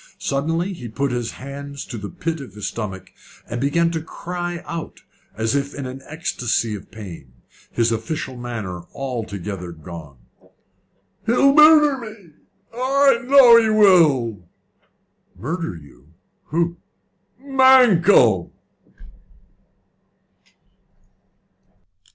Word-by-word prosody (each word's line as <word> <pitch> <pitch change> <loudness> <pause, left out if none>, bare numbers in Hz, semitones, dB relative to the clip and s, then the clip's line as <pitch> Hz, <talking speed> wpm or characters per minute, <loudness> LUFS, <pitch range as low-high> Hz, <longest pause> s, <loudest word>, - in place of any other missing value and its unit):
Suddenly 165 +7 -2
he 125 -9 -8
put 135 +4 -2
his 120 -2 -3
hands 140 +1 -8
to 125 - -8
the 105 -2 -6
pit 165 0 -4
of 130 - -11
his 105 - -6
stomach, 95 -4 -6 0.3
and 120 - -4
began 165 +5 +1
to 165 -1 -3
cry 175 +1 -6
out 165 -1 -7 0.4
as 110 +2 0
if 140 0 -2
in 140 - -5
an 130 +1 -7
ecstacy 120 -8 -2
of 105 - -9
pain, 90 - -11 0.4
his 115 0 +1
official 130 +4 -4
manner 110 -8 -6
altogether 100 -8 -5
gone. 80 -3 -11 1.1
"He'll 275 +4 +4
murder 300 -2 +6
me! 215 -7 -11 0.4
I 270 +1 +3
know 250 -3 +8
he 220 - 0
will!" 150 - +3 0.9
"Murder 160 - -4
you? 70 -4 -16 0.4
Who?" 170 +2 -1 0.6
"Mankell." 240 - +4
140 Hz, 105 wpm, -21 LUFS, 110-185 Hz, 1.1 s, know